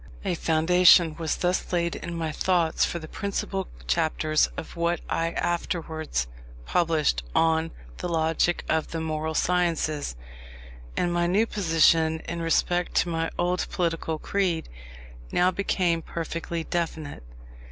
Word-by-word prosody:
A 190 Hz, -, +1 dB
foundation 170 Hz, 0 st, +5 dB
was 160 Hz, -2 st, -1 dB
thus 180 Hz, +1 st, -1 dB
laid 170 Hz, -1 st, 0 dB
in 170 Hz, 0 st, -6 dB
my 165 Hz, -2 st, -2 dB
thoughts 170 Hz, 0 st, +1 dB
for -, -, 0 dB
the 160 Hz, -2 st, -8 dB
principal 195 Hz, +1 st, -3 dB, 0.2 s
chapters 155 Hz, -2 st, +2 dB
of -, -, -7 dB
what 170 Hz, 0 st, 0 dB
I 165 Hz, 0 st, -1 dB
afterwards 160 Hz, -, -2 dB, 0.4 s
published 160 Hz, -, +1 dB
on 160 Hz, 0 st, +3 dB, 0.3 s
the -, -, -4 dB
Logic 165 Hz, +1 st, +1 dB
of 160 Hz, -1 st, +1 dB
the 165 Hz, -, -4 dB
Moral 160 Hz, 0 st, -2 dB
Sciences; 165 Hz, -, 0 dB, 0.8 s
and 175 Hz, -1 st, +1 dB
my 175 Hz, 0 st, +1 dB
new 200 Hz, +6 st, +3 dB
position 165 Hz, -5 st, +3 dB
in 170 Hz, 0 st, -5 dB
respect 175 Hz, +2 st, +1 dB
to 175 Hz, -, +3 dB
my 165 Hz, -1 st, -1 dB
old 180 Hz, +1 st, 0 dB
political 165 Hz, -2 st, -1 dB
creed, 180 Hz, -1 st, -1 dB, 0.6 s
now 180 Hz, +1 st, +3 dB
became 180 Hz, -3 st, 0 dB
perfectly 165 Hz, 0 st, -4 dB
definite. 160 Hz, -, -3 dB
165 Hz, 130 wpm, -26 LUFS, 160-175 Hz, 0.8 s, foundation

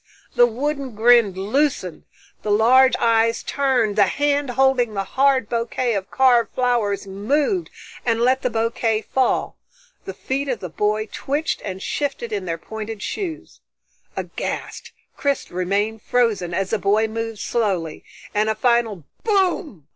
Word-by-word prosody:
The 240 Hz, -1 st, +5 dB
wooden 275 Hz, +1 st, -3 dB
grin 230 Hz, -2 st, +5 dB
loosened, 205 Hz, -, -1 dB, 0.4 s
the 215 Hz, -, -4 dB
large 250 Hz, +5 st, +5 dB
eyes 230 Hz, 0 st, +2 dB
turned, 255 Hz, -7 st, +1 dB
the 205 Hz, -2 st, +4 dB
hand 285 Hz, +1 st, 0 dB
holding 250 Hz, -3 st, +2 dB
the 195 Hz, -, -1 dB
hard 265 Hz, +1 st, +2 dB
bouquet 235 Hz, +1 st, -1 dB
of 195 Hz, -2 st, -3 dB
carved 245 Hz, -4 st, +3 dB
flowers 235 Hz, -6 st, 0 dB
moved, 280 Hz, -, -1 dB, 0.3 s
and 230 Hz, -2 st, +1 dB
let 255 Hz, +2 st, +2 dB
the 250 Hz, -, 0 dB
bouquet 225 Hz, -1 st, 0 dB
fall. 260 Hz, -1 st, 0 dB, 0.5 s
The -, -, -6 dB
feet 275 Hz, +2 st, -3 dB
of 245 Hz, -4 st, -1 dB
the 180 Hz, -, -6 dB
boy 210 Hz, +5 st, 0 dB
twitched 290 Hz, +4 st, -2 dB
and 190 Hz, +1 st, -5 dB
shifted 275 Hz, -6 st, -3 dB
in 200 Hz, -3 st, -3 dB
their 165 Hz, -2 st, -2 dB
pointed 220 Hz, +1 st, -7 dB
shoes. 345 Hz, -6 st, -5 dB, 0.6 s
Aghast, -, -, -5 dB, 0.3 s
Chris 280 Hz, -1 st, -1 dB
remained 200 Hz, +5 st, -1 dB
frozen 220 Hz, -9 st, +1 dB
as 190 Hz, +2 st, -2 dB
the 220 Hz, -, +1 dB
boy 210 Hz, +3 st, +2 dB
moved 225 Hz, 0 st, -4 dB
slowly, 190 Hz, -9 st, -2 dB, 0.3 s
and 210 Hz, +1 st, +1 dB
a 220 Hz, -, 0 dB
final 230 Hz, -6 st, +1 dB, 0.2 s
_Boom! 370 Hz, -, 0 dB
230 Hz, 145 wpm, -21 LUFS, 210-265 Hz, 0.6 s, The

